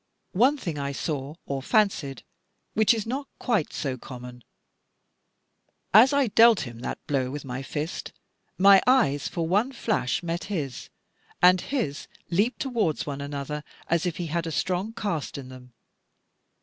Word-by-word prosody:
One 255 Hz, +10 st, +4 dB
thing 165 Hz, -, -4 dB
I 140 Hz, 0 st, -3 dB
saw, 145 Hz, 0 st, -3 dB
or 140 Hz, -1 st, -3 dB
fancied, 165 Hz, -6 st, +1 dB, 0.5 s
which 220 Hz, +1 st, +4 dB
is 225 Hz, -3 st, 0 dB
not 270 Hz, +4 st, -3 dB
quite 215 Hz, -11 st, 0 dB
so 130 Hz, -3 st, -3 dB
common. 125 Hz, -1 st, -10 dB, 1.5 s
As 230 Hz, +7 st, +8 dB
I 280 Hz, -1 st, +3 dB
dealt 230 Hz, 0 st, +6 dB
him 120 Hz, -2 st, -7 dB
that -, -, -6 dB
blow 135 Hz, -3 st, 0 dB
with 145 Hz, +1 st, -6 dB
my 130 Hz, 0 st, -4 dB
fist, 150 Hz, +4 st, -4 dB, 0.5 s
my 195 Hz, +1 st, +7 dB
eyes 145 Hz, -, +3 dB
for 165 Hz, -2 st, -2 dB
one 205 Hz, +9 st, +2 dB
flash 215 Hz, -, -1 dB
met 170 Hz, 0 st, -3 dB
his, 150 Hz, -, -4 dB, 0.5 s
and 180 Hz, 0 st, +6 dB
his 225 Hz, -, -3 dB, 0.2 s
leaped 215 Hz, +7 st, +1 dB
towards 225 Hz, -, 0 dB
one 140 Hz, -1 st, -5 dB
another, 145 Hz, +1 st, -4 dB, 0.2 s
as 170 Hz, +1 st, +1 dB
if 170 Hz, -, -3 dB
he 175 Hz, -, -3 dB
had 165 Hz, +1 st, -2 dB
a -, -, -3 dB
strong 185 Hz, +6 st, -1 dB
cast 175 Hz, -12 st, -3 dB
in 130 Hz, -2 st, -8 dB
them. 125 Hz, -1 st, -12 dB
165 Hz, 155 wpm, -26 LUFS, 140-215 Hz, 1.5 s, As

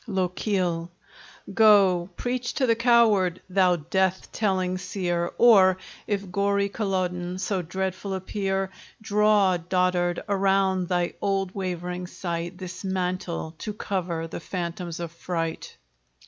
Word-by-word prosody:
LOCHIEL 180 Hz, -2 st, -1 dB, 0.6 s
Go, 195 Hz, -5 st, +5 dB
preach 245 Hz, 0 st, -2 dB
to 270 Hz, -, +2 dB
the 230 Hz, -, +4 dB
coward, 225 Hz, -7 st, +4 dB
thou 185 Hz, -1 st, +3 dB
death 185 Hz, +3 st, -1 dB
telling 185 Hz, -3 st, 0 dB
seer! 175 Hz, -2 st, -2 dB
Or, 195 Hz, -6 st, +6 dB, 0.3 s
if 200 Hz, -3 st, -2 dB
gory 200 Hz, +1 st, +1 dB
Culloden 185 Hz, -3 st, -2 dB
so 190 Hz, 0 st, -1 dB
dreadful 190 Hz, +2 st, -3 dB
appear, 195 Hz, 0 st, -2 dB, 0.3 s
Draw, 210 Hz, -3 st, +3 dB
dotard, 180 Hz, -1 st, +1 dB
around 195 Hz, -2 st, +2 dB
thy 175 Hz, -1 st, 0 dB
old 195 Hz, -2 st, 0 dB
wavering 180 Hz, -1 st, -4 dB
sight 175 Hz, 0 st, -4 dB
This 185 Hz, 0 st, -8 dB
mantle, 180 Hz, -3 st, -2 dB
to 210 Hz, -2 st, -5 dB
cover 180 Hz, -5 st, -2 dB
the 165 Hz, -, -6 dB
phantoms 170 Hz, -1 st, -5 dB
of 170 Hz, -2 st, -5 dB
fright. 165 Hz, -1 st, -4 dB
185 Hz, 120 wpm, -25 LUFS, 180-200 Hz, 0.6 s, Or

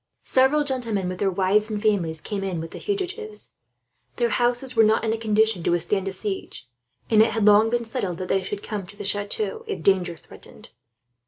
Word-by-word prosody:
Several 265 Hz, +3 st, +3 dB
gentlemen, 235 Hz, -9 st, -2 dB
with 180 Hz, 0 st, -6 dB
their 200 Hz, -, +2 dB
wives 195 Hz, +3 st, +2 dB
and 210 Hz, -1 st, -2 dB
families, 180 Hz, -7 st, 0 dB
came 200 Hz, +3 st, -4 dB
in 190 Hz, -3 st, -2 dB
among 165 Hz, 0 st, -5 dB
the -, -, -9 dB
fugitives. 410 Hz, +2 st, -4 dB, 0.6 s
Their 240 Hz, -1 st, +1 dB
houses 245 Hz, +2 st, 0 dB
were 225 Hz, -, +6 dB
not 220 Hz, +1 st, +3 dB
in 220 Hz, -1 st, +1 dB
a -, -, -2 dB
condition 220 Hz, -3 st, +2 dB
to -, -, -1 dB
withstand 175 Hz, +3 st, 0 dB
a -, -, -1 dB
siege, 190 Hz, -, -5 dB, 0.4 s
and 215 Hz, -1 st, +6 dB
it 220 Hz, 0 st, +3 dB
had 220 Hz, -1 st, +1 dB
long 210 Hz, +1 st, +6 dB
been 235 Hz, 0 st, -1 dB
settled 210 Hz, -7 st, -3 dB
that 185 Hz, -, -5 dB
they 195 Hz, -, +1 dB
should 200 Hz, +2 st, -5 dB
come 210 Hz, -2 st, -4 dB
into 190 Hz, +2 st, -13 dB
the 205 Hz, -, -6 dB
chateau, 205 Hz, -, -1 dB
if 415 Hz, -, -4 dB
danger 180 Hz, -3 st, +2 dB
threatened. -, -, -13 dB
210 Hz, 210 wpm, -24 LUFS, 190-240 Hz, 0.6 s, were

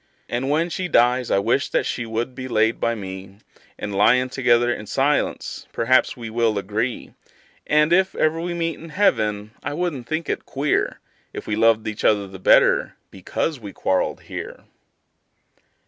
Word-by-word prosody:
And 125 Hz, +3 st, -2 dB
when 165 Hz, +4 st, +1 dB
she 185 Hz, +2 st, -2 dB
dies 125 Hz, -4 st, +3 dB
I -, -, +3 dB
wish 100 Hz, -, +1 dB
that -, -, 0 dB
she 120 Hz, -, -3 dB
would 115 Hz, +3 st, -3 dB
be 130 Hz, 0 st, -6 dB
laid 110 Hz, -1 st, +1 dB
by 115 Hz, 0 st, 0 dB
me, 95 Hz, -1 st, -8 dB, 0.4 s
And, 105 Hz, 0 st, -5 dB
lyin' 125 Hz, +6 st, +4 dB
together 120 Hz, -2 st, +2 dB
in 105 Hz, -, -8 dB
silence, 140 Hz, +6 st, -1 dB
perhaps 130 Hz, +3 st, +2 dB
we 115 Hz, -2 st, -7 dB
will 110 Hz, -1 st, 0 dB
agree; 105 Hz, +5 st, -3 dB, 0.5 s
And, 150 Hz, +2 st, +3 dB
if 190 Hz, +1 st, +3 dB
ever 160 Hz, +1 st, +1 dB
we 175 Hz, 0 st, -3 dB
meet 165 Hz, -1 st, -2 dB
in 165 Hz, -, -10 dB
heaven, 110 Hz, -, +1 dB
I 145 Hz, -, -4 dB
wouldn't 155 Hz, -8 st, -3 dB
think 160 Hz, +2 st, -2 dB
it -, -, -2 dB
queer 140 Hz, +2 st, -1 dB, 0.3 s
If -, -, -7 dB
we 105 Hz, -, -1 dB
loved 110 Hz, 0 st, +3 dB
each 110 Hz, -1 st, -5 dB
other 105 Hz, -2 st, +3 dB
the 95 Hz, 0 st, -11 dB
better -, -, +4 dB, 0.2 s
because 130 Hz, -, -3 dB
we 100 Hz, -3 st, -9 dB
quarreled 95 Hz, -, -1 dB
here. -, -, -8 dB
120 Hz, 170 wpm, -22 LUFS, 110-150 Hz, 0.5 s, lyin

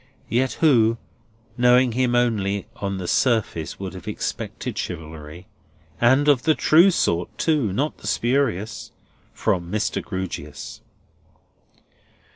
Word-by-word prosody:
Yet 130 Hz, +2 st, +1 dB
who, 115 Hz, -7 st, +3 dB, 0.6 s
knowing 125 Hz, 0 st, +5 dB
him 120 Hz, +1 st, +1 dB
only 100 Hz, -5 st, 0 dB
on 100 Hz, -1 st, -3 dB
the 90 Hz, -2 st, -5 dB
surface, 110 Hz, -, 0 dB
would 95 Hz, -1 st, -5 dB
have 95 Hz, -, -10 dB
expected -, -, -4 dB
chivalry—and 90 Hz, -, -3 dB
of 140 Hz, -4 st, +4 dB
the 155 Hz, +2 st, +2 dB
true 170 Hz, +5 st, +5 dB
sort, 85 Hz, -, -1 dB
too; 150 Hz, -, +1 dB
not 140 Hz, +10 st, -2 dB
the -, -, -9 dB
spurious—from 110 Hz, -7 st, -2 dB
Mr. 110 Hz, 0 st, -1 dB
Grewgious? 95 Hz, -7 st, -6 dB
110 Hz, 105 wpm, -23 LUFS, 95-130 Hz, 0.6 s, knowing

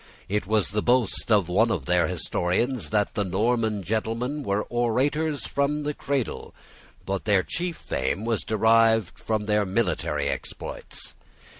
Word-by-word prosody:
It 105 Hz, -1 st, -1 dB
was 105 Hz, -4 st, +1 dB
the 105 Hz, +1 st, 0 dB
boast 120 Hz, -2 st, +1 dB
of 100 Hz, -5 st, +4 dB
one 110 Hz, +6 st, +3 dB
of 90 Hz, -12 st, -1 dB
their 90 Hz, -2 st, +3 dB
historians 90 Hz, -, -1 dB
that 105 Hz, -1 st, +1 dB
the 105 Hz, -, 0 dB
Norman 110 Hz, +2 st, 0 dB
gentlemen 115 Hz, -, -2 dB
were 100 Hz, -5 st, 0 dB
orators 135 Hz, +6 st, 0 dB
from 145 Hz, +1 st, 0 dB
the 150 Hz, 0 st, -1 dB
cradle. 140 Hz, -4 st, -3 dB, 0.5 s
But 95 Hz, 0 st, -2 dB
their 100 Hz, -3 st, +3 dB
chief 175 Hz, -1 st, -3 dB
fame 65 Hz, +12 st, -2 dB
was 115 Hz, -2 st, 0 dB
derived 110 Hz, -1 st, +3 dB
from 110 Hz, -2 st, -1 dB
their 105 Hz, 0 st, +2 dB
military 85 Hz, -8 st, 0 dB
exploits. -, -, -5 dB
110 Hz, 145 wpm, -25 LUFS, 95-120 Hz, 0.5 s, of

